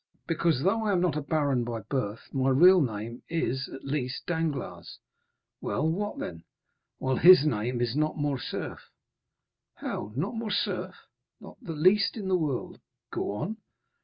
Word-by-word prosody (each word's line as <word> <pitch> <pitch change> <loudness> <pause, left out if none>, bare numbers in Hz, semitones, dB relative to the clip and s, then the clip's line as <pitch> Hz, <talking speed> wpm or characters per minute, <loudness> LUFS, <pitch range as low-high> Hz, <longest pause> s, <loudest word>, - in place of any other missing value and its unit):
"Because, 165 -4 +1
though 220 +4 +2
I 205 - +2
am 180 - +3
not 175 -4 +1
a 150 - -1
baron 140 -4 +1
by 115 -1 -4
birth, 115 -5 -4
my 135 -1 +2
real 180 +7 +7
name 115 -1 -3
is, 140 -5 -1
at 135 - -9
least, 135 -2 -3
Danglars." 160 -6 -3 0.6
"Well, 100 +10 0
what 205 +6 -2
then?" 85 -1 -6 0.5
"While 130 -1 0
his 175 -3 +8
name 120 -2 0
is 120 0 0
not 155 +1 0
Morcerf." 145 -4 -3 0.9
"How?—not 130 - -4
Morcerf?" 225 -2 -2 0.4
"Not - - -12
the 165 - -5
least 190 +9 +3
in 195 -3 -4
the 185 - +3
world." 150 -8 -2 0.3
"Go - - -2
on." 195 - -3
145 Hz, 150 wpm, -28 LUFS, 125-175 Hz, 0.9 s, his